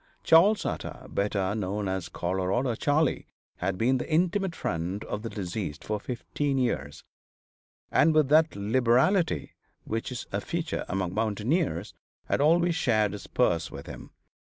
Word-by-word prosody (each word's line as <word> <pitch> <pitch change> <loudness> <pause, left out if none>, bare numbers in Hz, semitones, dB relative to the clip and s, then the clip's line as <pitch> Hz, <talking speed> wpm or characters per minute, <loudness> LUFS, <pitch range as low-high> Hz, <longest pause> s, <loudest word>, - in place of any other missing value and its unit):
Charles 195 +6 +5
Utter, - - -4
better 100 -1 0
known 105 -1 -2
as 95 -2 -3
Colorado 95 +8 -1
Charley, 145 +7 +1 0.3
had 90 +1 -2
been 125 +5 +2
the 160 - -5
intimate 180 +2 +1
friend 85 +5 -3
of 105 - -4
the 115 - -5
deceased 90 -6 -5
for 105 -1 -2
fifteen 135 +4 -2
years, 75 - -2 0.9
and 160 - +5
with 155 -3 +4
that 155 +1 +4
liberality 125 - +2 0.3
which 115 +3 -3
is 125 - -5
a 100 - -1
feature 165 +4 -3
among 95 -2 -1
mountaineers, 110 - -1 0.3
had - - 0
always 170 +3 +4
shared 110 - +2
his 105 - -8
purse 85 -1 +1
with - - -9
him. - - -9
115 Hz, 145 wpm, -27 LUFS, 95-155 Hz, 0.9 s, Charles